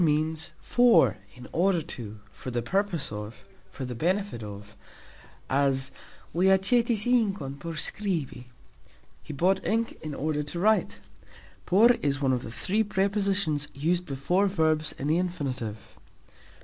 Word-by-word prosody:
"Por" - - +4
means 155 +1 0
"for, 230 - +4 0.2
in 125 0 -11
order 175 -1 +2
to, 110 -9 -8
for - - -8
the 120 -1 -2
purpose 190 - -1
of, 105 +2 -7 0.2
for 135 - -6
the 125 - -5
benefit 185 - -1
of", 105 0 -9 0.7
as 135 -1 +1 0.4
"Li 180 +3 +2
acxetis 215 +3 +3
inkon 200 - 0
por 165 +4 -5
skribi", 155 -7 -3 0.8
He - - -9
bought 185 +6 +1
ink 225 +1 -1
in 155 -2 -5
order 150 0 -1
to 150 +4 -5
write. 215 +4 +2 0.7
Por 215 +7 +6
is 140 -1 +1
one 135 -2 +2
of 125 - 0
the - - -7
three 195 - 0
prepositions 195 -6 0
used 175 +5 0
before 145 +9 +1
verbs 160 -4 +1
in 135 - -5
the 155 +4 +2
Infinitive. 135 - -4
160 Hz, 145 wpm, -27 LUFS, 135-195 Hz, 0.8 s, Por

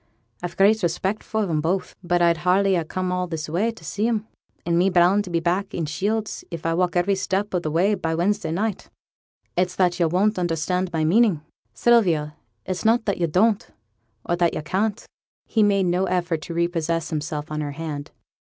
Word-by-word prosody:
I've 175 -1 -4
a - - -24
great 215 +3 +4
respect 190 +4 -1
for 220 -1 -2
'em 155 -3 0
both; 180 +4 -1
but 175 0 +2
I'd 170 -1 +4
hardly 185 +3 +3
ha' 165 -3 -1
come 185 +1 -2
all 180 0 -1
this 160 -2 -4
way 180 +9 0
for 230 - -6
to 175 - -15
see 210 +7 -1
'em, 220 -2 -1 0.4
and 170 0 +1
me 180 +3 +4
bound 180 +3 +4
to - - -8
be 170 -1 +1
back 180 +4 -1
i' 170 - -1
Shields, 205 +8 -2
if 170 -2 -7
I 165 - +1
walk 180 +1 0
every 175 +3 +2
step 195 +1 -1
of 180 - +1
the 155 - -2
way, 180 +7 +2
by 165 -5 -1
Wednesday 200 +4 0
night. 200 +4 -2 0.7
It's 180 0 0
that 180 -1 +1
yo' 170 - +3
won't 190 +5 +1
understand 175 +2 -1
my 160 -2 0
meaning, 190 0 +3 0.3
Sylvia; 170 -11 +3 0.3
it's 185 -1 -3
not 225 +1 +3
that 200 -3 -1
yo' 170 - +2
don't, 200 +6 +2 0.6
or 175 - +1
that 170 -1 +2
yo' - - -2
can't.' 205 +7 -1 0.4
He 225 - +1
made 200 -2 +3
no 180 +2 +1
effort 175 -3 -1
to 170 - -6
repossess 165 -1 -1
himself 155 -1 -4
of 155 0 -2
her 145 -1 -4
hand. 150 -2 -5
180 Hz, 210 wpm, -23 LUFS, 165-200 Hz, 0.7 s, great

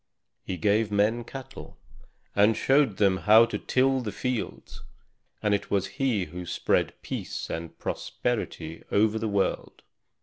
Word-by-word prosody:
He 90 - -4
gave 105 +4 +2
men 105 +4 +2
cattle, 135 +2 -10 0.6
and 105 +2 +4
showed 135 -7 +3
them 95 -2 +3
how 110 +4 +6
to - - -4
till 130 0 +2
the 110 -4 -4
fields; 125 0 -4 0.6
and 105 -1 +2
it 100 0 -1
was 100 -1 +1 0.2
he 115 -9 +1
who 90 +3 -7
spread 85 - 0
peace - - -5
and 80 0 -6
prosperity 80 +1 -3
over 110 +1 +3
the 110 0 -2
world. 100 -1 -1
105 Hz, 140 wpm, -27 LUFS, 100-120 Hz, 0.6 s, how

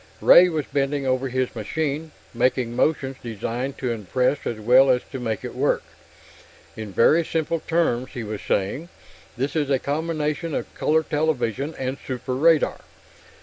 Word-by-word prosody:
Ray 180 +1 +7
was 155 -4 -2
bending 140 0 -1
over 130 0 0
his 130 0 -2
machine, 150 +7 -3 0.2
making 125 0 0
motions 135 -1 0
designed 120 +4 -4
to 125 -2 -2
impress 125 +6 -1
as 115 - -3
well 125 +5 +5
as 125 -1 +3
to 135 - -5
make 115 -4 -3
it - - -6
work. - - +1 0.9
"In 110 -2 -7
very 155 - +4
simple 165 +1 -1
terms," 155 -7 0
he 120 - -4
was 105 -1 -5
saying, 115 - -1 0.5
"this 135 +4 -2
is 150 -3 0
a 135 - +3
combination 150 +1 -2
of - - -4
color 160 +1 +1
television 150 -2 -1
and 130 +1 -3
super 125 0 -4
radar. 155 +4 +3
135 Hz, 155 wpm, -23 LUFS, 120-155 Hz, 0.9 s, Ray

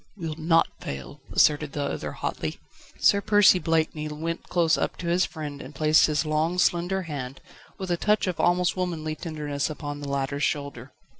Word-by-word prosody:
"We'll 165 -4 -4
not 165 +1 +3
fail," 70 -1 -7
asserted 150 -1 +3
the 145 - -2
other 140 - -3
hotly. - - -4 0.4
Sir 200 - +4
Percy 205 -3 +5
Blakeney 160 -2 0
went 160 +3 -5
close 170 -2 +3
up - - -2
to 175 - -5
his 175 +2 +3
friend 145 -3 -7
and 135 +3 -10
placed 155 +2 +5
his 155 +1 0
long, 155 +3 0
slender 180 +2 +1
hand, 135 -5 -6 0.4
with 190 -2 -4
a 175 - +1
touch 210 +3 +2
of 185 -3 -3
almost 175 0 +2
womanly 170 -4 -2
tenderness 150 -4 -3
upon 145 -1 -5
the 145 -1 -6
latter's 140 +1 -2
shoulder. 140 -4 -2
155 Hz, 175 wpm, -26 LUFS, 145-175 Hz, 0.4 s, Percy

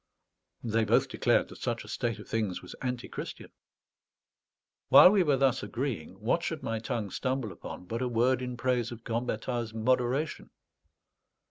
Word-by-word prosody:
They 115 -1 +1
both 110 - +3
declared - - +2
that - - -12
such - - -2
a - - -13
state 115 -1 -2
of 105 - -11
things 105 -6 -2
was 90 - -9
antichristian. 125 -2 -5 1.4
While 180 - +10
we 205 -2 +4
were 145 -6 +3
thus 135 -2 +2
agreeing, 120 - -4
what - - +1
should - - -4
my 115 0 -2
tongue 110 -3 -3
stumble 130 -3 -2
upon 90 - -9
but 115 +6 -4
a 130 - 0
word 125 +2 +2
in 125 -1 -4
praise 120 -1 0
of 120 -1 -9
Gambetta's 115 0 -2
moderation? 125 +6 0
120 Hz, 155 wpm, -29 LUFS, 115-130 Hz, 1.4 s, While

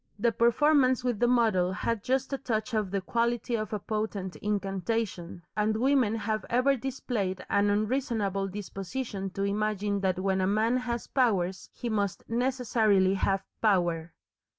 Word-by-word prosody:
The 230 +3 +2
performance 255 +3 +3
with 245 -4 -1
the 240 - +3
model 220 -7 +3
had 215 +3 -2
just 265 +2 0
a - - 0
touch 230 -2 -2
of 215 -3 0
the 195 0 -1
quality 235 +4 -1
of 215 -2 -1
a 215 - -1
potent 205 -3 -3
incantation, 195 -3 -2
and 215 +1 +1
women 255 -3 +3
have 215 0 -2
ever 255 +3 +3
displayed 225 -7 -3
an 200 0 +3
unreasonable 210 -3 0
disposition 195 +1 -5
to 195 +1 -4
imagine 205 0 0
that 190 -2 0
when 190 0 +1
a 185 - +2
man 220 +4 +2
has 240 -2 -3
powers 190 -8 0
he 245 - -6
must 205 -3 -2
necessarily 230 -6 +2
have 195 0 0 0.2
Power. 175 -6 +1
215 Hz, 150 wpm, -28 LUFS, 195-240 Hz, 0.2 s, performance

